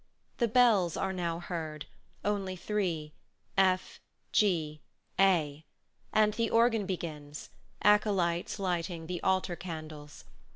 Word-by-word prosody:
The 235 - +3
bells 220 -7 +4
are 190 0 -1
now 170 -2 -2
heard 160 -4 -5 0.4
only 195 -2 -1
three, 175 -6 -2 0.4
F, 185 -1 +2 0.3
G, 160 -7 +1 0.4
A, 160 -6 +3 0.5
and 215 -1 +4
the 230 0 0
organ 230 -3 +3
begins, 150 -6 -6 0.3
acolytes 195 -5 +2
lighting 175 -3 -2
the 175 +1 -4
altar 185 -2 +1
candles. 155 -4 -8
180 Hz, 110 wpm, -31 LUFS, 160-205 Hz, 0.5 s, bells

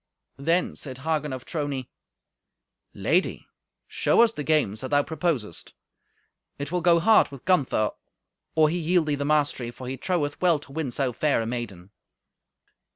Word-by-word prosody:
Then 165 +6 +1
said 130 -3 -6
Hagen 150 0 -1
of 130 -1 -6
Trony, 145 -5 -3 1.1
"Lady, 160 - 0 0.4
show - - +3
us 230 -1 +2
the 150 - -5
games 140 -10 +1
that 130 - -5
thou 145 0 +3
proposest. 155 - -3 0.8
It 145 +1 -5
will 180 0 0
go 170 0 +5
hard 220 +5 +5
with 140 -3 -12
Gunther 135 - +2 0.6
or 155 -1 +5
he 175 +3 -1
yield 170 0 +2
thee 150 - 0
the 140 0 -2
mastery, 145 -5 +1
for 125 +1 -9
he 130 +1 -4
troweth 150 -5 -1
well 175 -3 +4
to 145 -1 -13
win 155 -1 -2
so 125 0 -1
fair 150 +2 +1
a 115 - -1
maiden." 105 -6 -5
145 Hz, 160 wpm, -25 LUFS, 130-165 Hz, 1.1 s, go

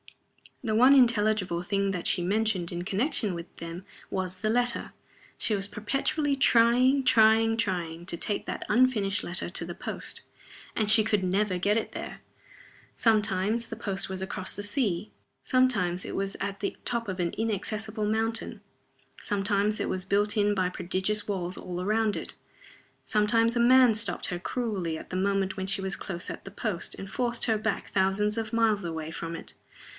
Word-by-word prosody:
The 220 -3 -1
one 250 +5 +6
intelligible 215 -8 +3
thing 200 +1 0
that 180 -3 -4
she 175 - +1
mentioned 195 -2 0
in 175 0 -4
connection 205 - 0
with 170 +1 -9
them 170 +2 -7 0.3
was 185 -1 -2
the 215 - -1
letter. 245 +1 +1 0.4
She 215 - +1
was 195 0 -2
perpetually 275 +8 -1
trying, 255 +2 +4
trying, 225 -1 +5
trying 175 -6 -2
to 170 - -3
take 205 +4 -2
that - - -5
unfinished 210 -5 +2
letter 175 0 -2
to 175 - -2
the 175 0 -7
post; - - -6 0.5
and 215 -2 +1
she 215 0 +7
could 210 -3 +1
never 190 +1 +1
get 210 +4 +1
there. - - -7 0.7
Sometimes 215 0 +1
the - - -6
post 195 -1 -1
was 190 0 -4
across 190 -1 -2
the 205 - -4
sea. 205 -4 0 0.3
Sometimes 205 -9 +1
it - - -5
was 195 0 -2
at 200 0 -4
the 200 - -3
top 235 -2 -1
of 190 -1 -4
an 170 -1 -1
inaccessible 215 0 -2
mountain. 225 +2 -1 0.6
Sometimes 205 +1 0
it - - -1
was 185 0 -3
built 205 +1 +1
in 205 0 +3
by 185 -2 +1
prodigious 190 +4 -1
walls 185 -3 -3
all 180 0 -5
round 215 0 +1
it. - - -6 0.7
Sometimes 225 +2 +2
a - - +1
man 250 -1 +6
stopped 215 +1 0
her 175 -4 -3
cruelly 195 -6 -2
at - - -9
the - - -3
moment 195 +1 0
when 190 0 -3
she 195 0 +1
was 190 -1 -2
close 175 -3 -5
at - - -9
the 195 - -8
post, 205 -4 -3
and 195 - -8
forced 240 +2 0
her 225 -2 +2
back 215 -1 -2
thousands 200 +3 +1
of 225 0 -3
miles 220 -3 +2
away 160 -2 -4
from 165 0 -5
it. - - -8
205 Hz, 175 wpm, -28 LUFS, 185-225 Hz, 0.7 s, she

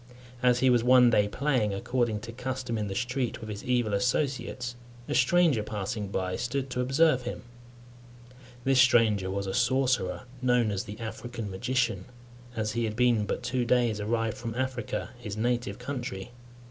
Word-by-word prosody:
As 125 -1 +3
he 130 -1 +5
was 120 -2 +3
one 125 -1 +6
day 105 -2 +3
playing, 120 -4 0
according 120 0 -1
to 115 +1 -7
custom, 125 0 -4
in 105 -2 -2
the 95 - -4
street, 125 +2 -2
with 110 -2 -8
his 100 - -6
evil 120 -4 +1
associates, 125 +2 -1 0.3
a - - -2
stranger 155 -2 +4
passing 105 0 -4
by 95 -1 -2
stood 130 +1 -2
to 125 - -1
observe 135 +1 +3
him. - - -6 1.2
This 135 0 +5
stranger 110 -7 +4
was 100 +1 -2
a 95 - -3
sorcerer, 130 -6 +1 0.2
known 125 -3 +2
as 100 -2 -2
the 105 +2 -8
African 115 -1 -6
magician, 115 -1 -1 0.5
as 110 -1 -1
he 115 +1 -1
had 110 -1 -3
been 120 -3 +2
but - - -3
two 125 0 0
days 120 -3 +2
arrived 115 +1 -1
from 115 -1 -5
Africa, 130 -2 -3
his 105 -4 -6
native 120 -2 -1
country. 125 -6 -5
120 Hz, 170 wpm, -28 LUFS, 105-125 Hz, 1.2 s, one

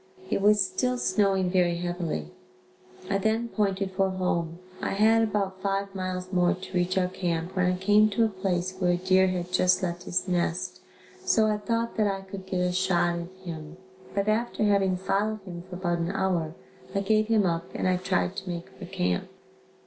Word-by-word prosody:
It - - +1
was 205 -1 +5
still 250 +5 -1
snowing 190 -4 +2
very 180 -2 +3
heavily. 170 - -3 0.8
I 195 0 +1
then 220 +3 0
pointed 195 -3 0
for 190 0 +1
home. 170 -3 -1 0.2
I - - -1
had 220 +3 +4
about 195 -3 -1
five 195 0 -1
miles 185 0 -4
more 180 +1 +3
to 185 +1 -10
reach 180 +1 +1
our 185 -1 +3
camp 175 -1 -3
when 180 -1 +3
I 180 - -1
came 210 +3 +4
to 225 +3 +2
a - - +1
place 185 -2 -2
where 180 -2 +3
a - - +1
deer 185 +1 +4
had 180 -1 -2
just 185 0 +3
left 175 -1 -3
his 180 - -1
nest, 180 +1 -1 0.4
so 220 - +3
I 210 -1 +1
thought 230 +2 -2
that 215 -1 +3
I 195 -1 -2
could 190 0 -9
get 185 -1 -1
a 180 0 +1
shot 180 -2 +1
at 170 0 -6 0.2
him 160 -1 -7 0.4
but 200 0 0
after 220 +1 0
having 195 -3 +3
followed 205 +3 -1
him 175 -2 -7
for 180 - -6
about 175 -2 -1
an 170 +1 -1
hour, 175 -4 -1 0.4
I 195 - +2
gave 215 +2 +2
him 220 -3 +3
up 170 -1 -1
and - - 0
I 185 0 +3
tried 185 0 0
to 190 -2 -5
make 170 -1 -5
for 190 - -10
camp. 90 - -1
185 Hz, 200 wpm, -27 LUFS, 180-200 Hz, 0.8 s, was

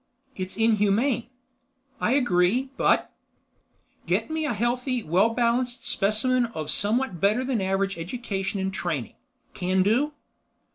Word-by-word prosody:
"It's 185 0 -6
inhumane." 225 +3 +2 0.7
"I 235 - +1
agree, 245 0 +2
but—?" - - +2 0.9
"Get - - 0
me 315 0 -1
a 280 - 0
healthy, 245 +2 -1
well 185 +7 +3
balanced 240 +1 0
specimen 230 +5 +2
of 155 -1 -2
somewhat 210 -3 0
better 210 +6 +3
than 250 -5 0
average 195 0 -1
education 195 +1 -3
and 190 0 -2
training. 155 - -3 0.4
Can 185 +1 +1
do?" 255 +9 +1
215 Hz, 125 wpm, -25 LUFS, 190-250 Hz, 0.9 s, well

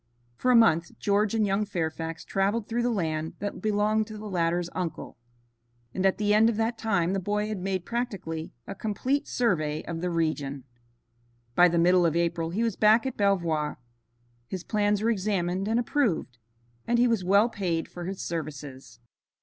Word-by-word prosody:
For 255 - -1
a 250 - +6
month 170 -8 +4
George 205 +1 +1
and 220 -1 +2
young 200 +1 +1
Fairfax 165 -4 -4
traveled 205 +3 0
through 235 +1 -1
the 240 - +1
land 160 -7 -2
that 205 0 -5
belonged 215 0 +1
to 215 -1 -8
the 215 - -8
latter's 175 -2 0
uncle, 180 -3 -4 0.8
and 190 +1 +2
at 190 - +1
the 210 0 +2
end 220 +2 +5
of 225 - -2
that 225 +1 0
time 195 -6 0
the 195 - 0
boy 210 +3 -1
had 215 -3 -3
made 185 -1 -2
practically 190 -10 -4
a - - -6
complete 225 +8 -1
survey 155 -10 0
of 165 -1 -5
the 180 - -1
region. 155 -5 -1 0.9
By 175 +7 +6
the 170 0 0
middle 180 +1 +4
of 165 - -1
April 170 -1 0
he 205 +7 -1
was 225 -4 0
back 220 +3 +4
at 265 - -3
Belvoir. 170 -7 0 0.7
His 185 +3 -5
plans 210 -1 +1
were 230 - +3
examined 190 -2 -1
and 225 +2 +2
approved, 220 - 0 0.5
and 240 - +2
he 245 +1 +4
was 230 -5 +1
well 200 +5 +4
paid 180 -8 -2
for 175 -1 -8
his 190 +1 -5
services. 140 -7 -6
195 Hz, 180 wpm, -27 LUFS, 170-215 Hz, 0.9 s, a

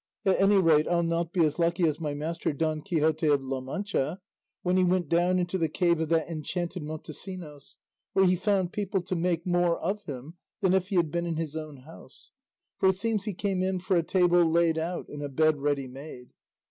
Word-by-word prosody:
At 190 -1 +3
any 200 +1 +5
rate 160 -5 +4
I'll 170 -1 +2
not 165 0 -1
be 175 -3 +3
as 150 +2 -2
lucky 170 +1 +1
as 155 -1 0
my 150 -3 -3
master 160 +3 -2
Don 155 +1 -1
Quixote 155 0 +1
of 145 -2 +3
La 135 0 -3
Mancha, 175 +2 -2 0.4
when 180 0 +1
he 185 - +4
went 180 -3 +1
down 175 +2 +3
into 180 +1 -1
the 160 -2 +1
cave 170 +1 +2
of 160 -1 -1
that 165 -1 +2
enchanted 170 +2 -4
Montesinos, 155 0 -8 0.4
where 190 - +4
he 185 0 +4
found 190 -1 0
people 195 -2 -1
to 185 +1 -3
make 170 -1 0
more 175 -1 +2
of 195 +5 -2
him 145 +4 -8 0.2
than 190 -2 +2
if 190 -1 +2
he 200 - -3
had 170 -4 +2
been 170 +1 -1
in 165 - -2
his 160 -2 -4
own 155 -4 -7
house; 160 +5 -15 0.5
for 190 - +5
it 190 - +1
seems 215 0 -1
he 210 -4 -3
came 195 -1 -1
in 190 0 0
for 190 +1 0
a 170 - +4
table 175 0 +3
laid 165 0 +2
out 170 +2 -3
and 145 - -8
a 145 - -4
bed 155 +2 +2
ready 140 -1 -1
made. 130 -1 -10
170 Hz, 220 wpm, -28 LUFS, 155-185 Hz, 0.5 s, any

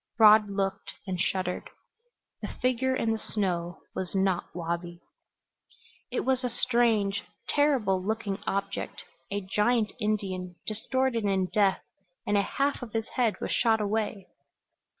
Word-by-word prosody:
Rod 215 -2 +7
looked, 195 0 -2
and 185 -3 -2
shuddered. 185 -1 -1 0.7
The - - -3
figure 255 +1 0
in 225 -3 +1
the 225 - -1
snow 175 -5 -2
was 185 0 -4
not 190 -2 +2
Wabi. 170 0 -3 1.1
It - - -1
was 260 0 +1
a 250 - 0
strange, 230 -5 +2 0.3
terrible 255 -11 +3
looking 210 -1 -2
object 200 0 -2 0.3
a 205 +1 -2
giant 210 +3 +1
Indian, 190 -4 -2
distorted 235 +1 0
in 190 -2 +2
death 200 -2 +3 0.4
and 205 - +1
a 200 - +5
half 275 +8 0
of 235 -4 -7
his 225 -1 -2
head 235 -4 +1
was - - -2
shot 225 -2 +3
away! 210 -2 -1
210 Hz, 135 wpm, -28 LUFS, 190-230 Hz, 1.1 s, Rod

